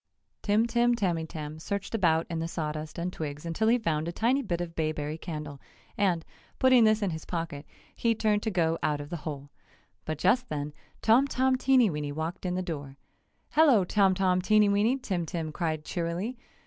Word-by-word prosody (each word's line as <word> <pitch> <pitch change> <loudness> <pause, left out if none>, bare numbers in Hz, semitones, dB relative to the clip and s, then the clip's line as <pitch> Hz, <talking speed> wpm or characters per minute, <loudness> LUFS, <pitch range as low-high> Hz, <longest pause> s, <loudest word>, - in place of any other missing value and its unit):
Tim 210 +2 +2
Tim 240 0 +2
Tamytam 160 -6 -3
searched 200 +4 -4
about 165 -6 +2
in 165 -1 -3
the 165 - -2
sawdust 155 -1 -4
and 175 +2 -3
twigs 150 0 -5
until 170 +7 0
he 235 +2 +5
found 165 -8 -1
a - - -2
tiny 240 +9 +1
bit 175 -9 -2
of 175 -1 -4
bayberry 155 -2 -2
candle, 150 -4 -7 0.3
and, 180 -5 +1 0.3
putting 255 -3 +6
this 215 0 +3
in 195 - 0
his 160 -1 -5
pocket, 165 -4 -5 0.3
he 230 -1 +1
turned 210 -1 +1
to 220 - -1
go 165 -4 +1
out 150 0 0
of 145 0 -8
the 175 - -2
hole. 145 -2 -7 0.5
But 155 -1 -3
just 245 - +2
then 145 -2 -3 0.3
Tom 240 +5 +5
Tom 260 -1 +2
Teenyweeny 215 - +2
walked 160 +5 -4
in 180 - -1
the 185 - -1
door. 145 -6 -6 0.5
"Hello, 285 -10 +5
Tom 190 0 +3
Tom 185 -1 +2
Teenyweeny!" 210 +4 +3
Tim 180 -4 -1
Tim 160 -1 -3
cried 155 -1 -2
cheerily. 175 +7 -3
175 Hz, 185 wpm, -28 LUFS, 155-215 Hz, 0.5 s, putting